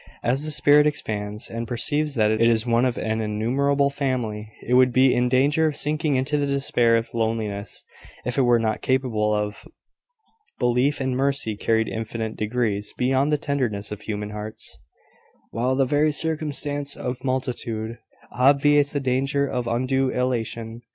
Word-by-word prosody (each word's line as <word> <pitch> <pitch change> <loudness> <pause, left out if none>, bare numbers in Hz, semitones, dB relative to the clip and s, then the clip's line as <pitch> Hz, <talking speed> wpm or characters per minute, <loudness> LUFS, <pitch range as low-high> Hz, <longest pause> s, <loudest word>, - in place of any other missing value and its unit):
As 130 +4 0
the - - -1
spirit 150 0 +5
expands, 105 -7 -4
and 115 0 -5
perceives 145 +5 0
that 110 -2 +3
it 110 +1 0
is 115 0 +3
one 120 +1 +2
of 125 -2 -1
an 110 0 -1
innumerable 135 +7 +1
family, 120 -6 -3
it 125 - -1
would 125 0 +5
be 130 +1 +4
in 125 0 +1
danger 145 +5 +3
of 150 - -2
sinking 150 -1 0
into 135 +3 0
the 145 - 0
despair 125 -4 +2
of 115 - -4
loneliness 110 -3 -2 0.4
if 125 - -1
it 140 - +3
were 120 -2 +4
not 110 -2 -1
capable 125 -5 0
of: 105 0 -2 0.9
"Belief 125 +4 +1
In 130 -1 -1
mercy 135 -5 0
carried 110 +1 +1
infinite 110 0 -4
degrees 105 -2 -2
Beyond 135 +3 +1
the 150 - +3
tenderness 120 -9 -2
of 105 0 -6
human 105 -1 -4
hearts," 105 +1 -5 0.8
while 125 +4 0
the 135 0 +2
very 150 +3 +2
circumstance 145 -2 -1
of 125 +1 -5
multitude 120 -3 -3 0.3
obviates 140 +3 +3
the 145 - 0
danger 135 +2 0
of 125 -3 -3
undue 130 +3 +1
elation. 115 -2 -2
125 Hz, 160 wpm, -23 LUFS, 110-140 Hz, 0.9 s, spirit